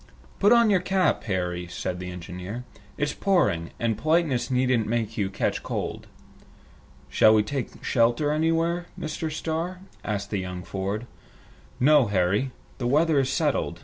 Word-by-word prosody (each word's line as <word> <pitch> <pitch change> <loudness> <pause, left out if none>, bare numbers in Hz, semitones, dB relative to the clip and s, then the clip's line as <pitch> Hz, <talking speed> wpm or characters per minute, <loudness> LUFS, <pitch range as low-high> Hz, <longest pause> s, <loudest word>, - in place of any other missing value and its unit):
"Put 205 +2 +5
on 235 -2 +6
your 190 - +4
cap, 185 +1 +1
Harry," 90 -3 -2
said 90 +1 -4
the 90 0 -5
engineer. 90 +6 -7 0.3
"It's 145 - 0
pouring, 170 - +1
and 115 -2 0
politeness 155 -6 +1
needn't 125 -3 +2
make 115 -1 -1
you 100 -3 0
catch 100 - -1
cold." - - -4 1.0
"Shall 110 0 +5
we 105 - +4
take 130 +4 -5
shelter 120 +5 +2
anywhere, 165 +3 +1
Mr. 155 0 -3
Starr?" 165 +4 -3 0.2
asked 105 0 -3
young 90 -2 -3
Ford. 100 +5 -3 0.7
"No, 145 -1 +5
Harry. 100 +6 +1 0.3
The 120 - -1
weather 150 +3 +3
is 135 -1 +1
settled. 135 - 0
120 Hz, 145 wpm, -26 LUFS, 100-160 Hz, 1.0 s, on